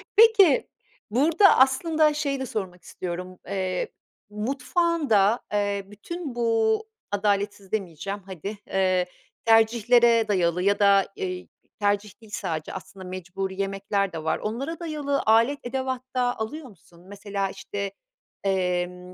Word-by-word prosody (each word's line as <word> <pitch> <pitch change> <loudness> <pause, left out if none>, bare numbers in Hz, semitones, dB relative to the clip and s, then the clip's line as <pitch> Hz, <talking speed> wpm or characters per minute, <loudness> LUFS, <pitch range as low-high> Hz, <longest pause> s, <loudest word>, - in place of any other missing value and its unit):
Peki, 430 - +6 0.4
burada 315 - +5
aslında 305 +4 +4
şeyi 285 -2 -1
de 265 - -2
sormak 185 -6 -5
istiyorum. 180 +1 -6
Eee, 185 -2 -2 0.4
mutfağında, 255 - +1
eee, 205 -1 0
bütün 265 - -7
bu, 225 - +2 0.3
adaletsiz 205 -1 -1
demeyeceğim 195 -1 -3
hadi, 195 +2 -6
eee, 185 -1 +2 0.4
tercihlere 230 +1 +5
dayalı 180 -3 +1
ya 200 +1 +2
da, 200 -1 +5
eee, 180 -1 -4 0.3
tercih 205 0 -1
değil 215 -2 -16
sadece, 160 -5 -4
aslında 190 0 -9
mecburi 190 +1 -4
yemekler 195 0 -1
de 160 -1 -5
var. 160 - 0
Onlara 265 +10 -4
dayalı 300 -4 -1
alet 230 +6 +4
edevat 260 0 -2
da 245 -1 +1
alıyor 280 +8 -4
musun? 175 -4 -19
Mesela, 200 -1 -3
işte, 200 0 -5 0.5
emm, 180 -1 -1
205 Hz, 120 wpm, -25 LUFS, 190-255 Hz, 0.5 s, Peki